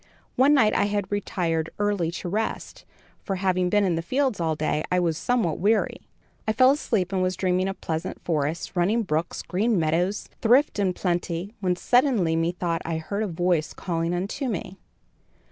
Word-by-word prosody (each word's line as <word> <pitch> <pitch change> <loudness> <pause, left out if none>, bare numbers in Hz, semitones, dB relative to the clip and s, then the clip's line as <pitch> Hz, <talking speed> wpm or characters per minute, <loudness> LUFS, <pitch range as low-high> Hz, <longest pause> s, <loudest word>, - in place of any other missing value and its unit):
One 275 +4 +5
night 220 -6 +4
I - - +2
had 205 -1 -2
retired 170 -5 -1
early 205 -5 0
to 175 - -5
rest, 215 +5 -3 0.4
for, 195 - -2
having 185 -1 +1
been 205 +2 +3
in 185 -3 +2
the 165 - -1
fields 255 +3 0
all 160 -2 0
day, 155 0 -1
I 180 - +3
was 170 -2 +1
somewhat 185 -1 0
weary. 210 +5 +1 0.5
I 215 - +2
fell 255 +3 +6
asleep 210 - -1
and 190 - +1
was 185 0 0
dreaming 185 0 +1
of 195 - -5
pleasant 160 +3 -3
forests, 155 +2 -2
running 200 +7 +2
brooks, 165 -3 -2
green 210 +4 +1
meadows, 175 +5 0
thrift 245 +1 +3
and 185 -3 +1
plenty, 175 +2 -2
when 180 -3 +1
suddenly 235 - +2
methought 170 0 -1
I 165 -1 -2
heard 200 +6 -3
a 215 - 0
voice 175 -2 0
calling 170 -1 -2
unto 200 +10 -3
me. 190 -3 -4
185 Hz, 180 wpm, -25 LUFS, 170-210 Hz, 0.5 s, fell